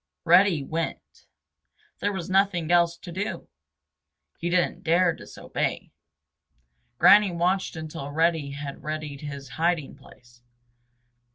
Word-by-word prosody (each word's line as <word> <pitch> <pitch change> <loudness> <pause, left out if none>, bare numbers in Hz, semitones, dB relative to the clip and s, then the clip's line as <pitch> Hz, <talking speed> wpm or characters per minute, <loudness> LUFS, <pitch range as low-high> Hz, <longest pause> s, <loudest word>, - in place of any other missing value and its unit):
Reddy 175 -2 +5
went. 165 +3 -5 0.7
There 205 - 0
was 190 -4 -5
nothing 185 -4 +1
else 170 -1 +3
to 175 - -10
do. 190 0 -4 0.9
He 170 - -2
didn't 180 0 0
dare 170 +1 +3
disobey. - - -4 1.1
Granny 210 -1 +7
watched 180 +3 0
until 155 -3 -6
Reddy 160 -1 +1
had 140 0 -7
readied 155 -2 -5
his 140 -2 -7
hiding 165 -4 0
place. 120 -3 -19
170 Hz, 110 wpm, -25 LUFS, 150-175 Hz, 1.1 s, Granny